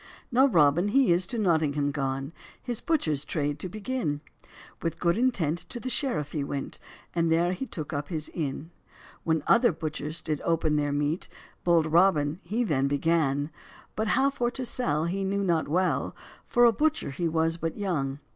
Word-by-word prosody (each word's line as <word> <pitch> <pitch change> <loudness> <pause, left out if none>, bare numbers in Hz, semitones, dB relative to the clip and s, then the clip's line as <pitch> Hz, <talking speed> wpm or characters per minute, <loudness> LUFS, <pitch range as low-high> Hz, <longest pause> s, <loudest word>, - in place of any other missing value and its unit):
Now 260 +3 +5
Robin 170 - +4
he 255 0 +4
is 175 +2 +3
to 240 - -3
Nottingham 155 -7 +1
gone, 135 +1 -3 0.3
His 240 -3 -3
butchers 155 - 0
trade 145 -1 -2
to 185 - -4
begin; 215 - -3 0.6
With 165 -1 -3
good 170 -1 +2
intent 195 - +1
to 240 - -6
the 255 +2 -4
sheriff 150 - -1
he 150 - -2
went, 140 0 -5 0.3
And 170 -1 +1
there 170 +2 +3
he 265 +8 -5
took 155 -9 -6
up 145 0 -3
his 155 -4 -3
inn. 155 0 -4 0.5
When 160 -2 +1
other 235 -1 +5
butchers 155 0 -5
did 155 -2 -2
open 160 -2 +1
their 145 -1 +1
meat, 145 +4 -1 0.3
Bold 170 -2 +4
Robin 160 -2 +3
he 215 +7 -1
then 140 - +1
begun; 145 0 +1 0.4
But 220 +1 -1
how 275 +1 +3
for 245 -3 0
to 255 +1 -5
sell 155 -11 0
he 190 +3 -1
knew 200 +1 0
not 170 -4 +1
well, 180 +5 0 0.3
For 240 -1 +5
a 235 - +6
butcher 305 - 0
he 170 +5 -1
was 165 0 +1
but 165 -1 -3
young. 150 -10 -1
165 Hz, 180 wpm, -27 LUFS, 150-200 Hz, 0.6 s, a